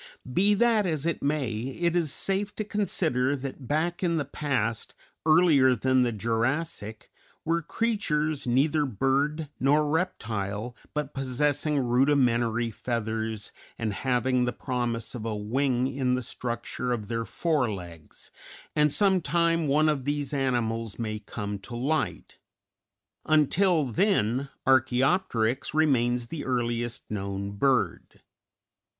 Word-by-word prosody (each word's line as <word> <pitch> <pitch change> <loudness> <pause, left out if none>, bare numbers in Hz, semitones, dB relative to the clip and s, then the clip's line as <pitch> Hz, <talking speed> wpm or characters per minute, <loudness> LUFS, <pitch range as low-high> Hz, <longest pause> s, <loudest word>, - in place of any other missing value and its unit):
Be 205 +6 +4
that 220 -2 +3
as 155 -3 -2
it 170 - -1
may, 140 -4 0
it 135 +10 -2
is 165 -5 +1
safe 195 +5 -1
to 215 - -2
consider 160 -10 0
that 135 -1 -7
back 165 +5 0
in 170 -3 +1
the 145 - -1
past, 130 -6 -2 0.3
earlier 155 -6 +5
than 130 +2 +2
the 120 -1 +2
Jurassic, 115 - -2 0.3
were 170 +1 +1
creatures 155 - -1
neither 145 +5 +2
bird 140 +6 0
nor 145 +3 +3
reptile, 115 - -2 0.2
but 150 -1 -2
possessing 145 +3 0
rudimentary 120 -3 +2
feathers 110 -2 -3 0.3
and 110 -2 -2
having 125 +2 +1
the 120 - -1
promise 120 -3 -3
of 120 - -6
a 110 -1 -2
wing 125 +4 0
in 130 -1 0
the 125 - -3
structure 120 +1 -4
of 110 -4 -2
their 115 0 -2
fore 145 -2 0
legs, 85 -5 -9 0.4
and 150 -1 +4
some 190 +1 +3
time 165 +1 +1
one 150 +3 +3
of 145 -4 0
these 145 -1 -2
animals 115 -5 -1
may 110 -2 -3
come 105 -1 -5
to 120 +4 -8
light; 145 +6 -2 0.9
until 155 +2 +3
then 130 - +1 0.2
Archæopteryx 130 -1 +2
remains 125 -6 +2
the 160 -3 -5
earliest 120 -2 -2
known 100 -1 -3
bird. 130 +6 0
130 Hz, 130 wpm, -27 LUFS, 115-155 Hz, 0.9 s, earlier